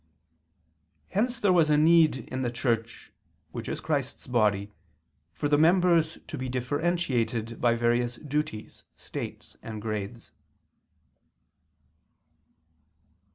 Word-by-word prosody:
Hence 240 +5 0
there 200 -5 +3
was 165 -4 +4
need 155 -3 +4
in 130 - -2
the 125 - 0
Church, 115 -1 -2 0.4
which - - -6
is - - -3
Christ's - - -3
body, 105 -4 +1 0.6
for 115 - -2
the 145 0 +3
members 170 -1 +4
to 150 - -6
be 130 0 -3
differentiated 125 -4 -1
by 120 -1 +3
various 120 +1 +1
duties, 145 -5 -4
states, - - -8
and 110 -2 -7
grades. 110 +1 -5
130 Hz, 105 wpm, -27 LUFS, 115-160 Hz, 0.6 s, was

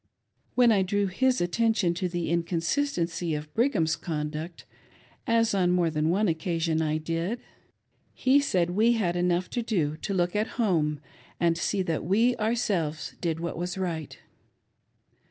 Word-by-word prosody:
When 245 -2 +5
I 200 -3 +4
drew 200 +2 +1
his 255 +7 +1
attention 190 0 +1
to 180 +1 -2
the 175 -1 -2
inconsistency 170 - -1
of 150 0 -7
Brigham's 225 - +2
conduct, 155 +1 -5 0.6
as 230 -2 +3
on 185 -3 +2
more 175 -2 +2
than 155 +1 0
one 205 +5 +2
occasion 165 -1 0
I 155 -1 0
did, 165 +8 -2 0.8
he 265 +2 +4
said 180 -11 +1
we 220 +6 +3
had 185 -7 0
enough 175 0 +1
to 245 - -1
do 175 -10 0
to 200 - -4
look 175 +1 0
at 210 +2 -1
home 160 - +1 0.4
and 170 -1 +3
see 190 +3 0
that 165 -3 -2
we 225 +9 +3
ourselves 205 -9 -1
did 165 -2 -1
what 170 -1 -4
was 180 +1 -3
right. 165 -5 -4
175 Hz, 155 wpm, -27 LUFS, 165-215 Hz, 0.8 s, When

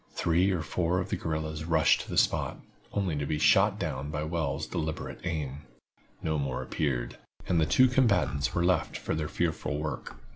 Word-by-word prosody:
Three 85 +3 +2
or 90 -4 0
four 85 +3 0
of 90 - -2
the - - 0
guerrillas 80 0 -3
rushed 80 -1 +3
to - - -10
the - - -3
spot, - - +2 0.3
only 95 -6 -1
to 70 - -1
be 75 - 0
shot - - +4
down 65 +3 -3
by 75 0 -2
Wells' 75 -3 -2
deliberate 80 -2 -4
aim. 75 -5 -3 0.6
No 80 -1 0
more 65 -3 -2
appeared, 65 -5 -2 0.3
and 85 -3 +2
the 80 - +2
two 130 - +6
combatants 90 - +2
were 85 0 +2
left 90 0 0
to - - 0
their 80 -1 -1
fearful 80 -3 -1
work. 75 0 -4
80 Hz, 185 wpm, -29 LUFS, 75-85 Hz, 0.6 s, two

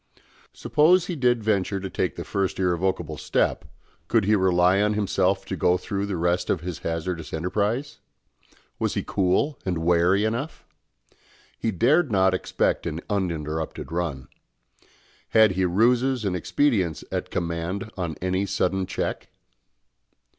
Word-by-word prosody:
Suppose 170 +4 +3
he 180 - -4
did 125 -5 +1
venture 100 -2 0
to 95 - -5
take 95 - -2
the - - -5
first 95 -2 -2
irrevocable 90 -3 -1
step, - - 0 0.4
could 110 -4 +2
he 105 +2 +4
rely 95 0 +3
on 105 0 +1
himself 95 -2 +1
to 95 - -4
go 90 +1 +2
through 100 +1 -3
the 100 -3 -2
rest 90 +1 0
of 85 - +1
his 90 -2 -5
hazardous 80 -1 -4
enterprise? 105 - -2 0.8
Was - - -1
he - - -1
cool 100 +10 +1
and 90 -3 -1
wary 85 +4 +3
enough? 120 +8 -3 0.9
He 115 - 0
dared 130 - +2
not 95 -2 +3
expect 95 - 0
an 80 +1 -4
uninterrupted 80 -6 -3
run. 80 -7 -3 1.0
Had 110 -2 +5
he 95 0 0
ruses 120 +6 +2
and 95 -2 0
expedients 95 - 0
at - - -3
command 85 +4 -3
on 85 -5 -3
any 95 +2 0
sudden 95 -1 0
check? 95 - -3
95 Hz, 140 wpm, -25 LUFS, 90-105 Hz, 1.0 s, Had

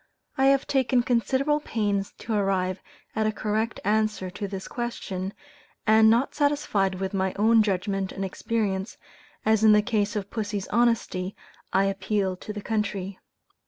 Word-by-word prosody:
I 265 - +2
have 275 0 +4
taken 260 -2 +2
considerable 265 +5 +1
pains 205 -8 -1
to 225 - -4
arrive 190 -2 0 0.3
at 220 -1 +1
a - - +2
correct 215 +2 -2
answer 215 -3 +1
to 200 +3 -4
this 195 -1 -6
question, 200 -6 -4 0.5
and 220 0 +6
not 235 +4 +2
satisfied 285 -10 +1
with 190 +1 -3
my 190 -1 0
own 220 +2 +5
judgment 195 -1 -1
and 195 - -3
experience, 195 0 -2 0.5
as 220 0 +3
in 215 -1 +8
the 210 0 +5
case 210 -2 0
of 200 -1 -4
pussy's 205 -3 -3
honesty, 220 -5 +1 0.4
I 190 +1 +3
"appealed 195 -1 -1
to 215 - -6
the 210 0 -6
country." 200 -3 -2
210 Hz, 155 wpm, -26 LUFS, 195-230 Hz, 0.5 s, in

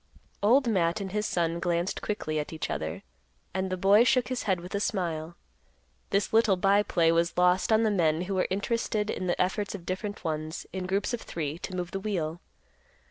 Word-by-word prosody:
Old 245 +6 +4
Matt 180 -4 +2
and 195 -2 -5
his 210 +1 -1
son 170 -1 0
glanced 175 +1 -1
quickly 155 -7 -2
at 150 - -4
each 160 -1 -4
other, 80 0 -4 0.5
and 190 0 -1
the 185 - -2
boy 200 +5 +6
shook 250 0 +2
his 255 -1 -2
head 185 -2 +2
with 180 +1 -9
a 200 - 0
smile. 170 -5 -2 0.7
This 200 +2 0
little 220 -3 +5
by 195 +2 +4
play 170 -5 +2
was 170 +1 +1
lost 180 +3 +3
on 220 +1 +5
the 220 - +2
men 165 -4 +2
who 195 +2 -3
were 185 - +1
interested 210 +1 -1
in 185 - -3
the 175 - 0
efforts 200 +3 0
of 175 -4 -9
different 200 +3 -4
ones, 155 0 -3
in 185 -1 -3
groups 195 +4 0
of 235 - -2
three, 155 -1 -4
to 185 - -6
move 180 -1 -3
the 195 - -3
wheel. 175 -5 -2
185 Hz, 205 wpm, -28 LUFS, 170-205 Hz, 0.7 s, boy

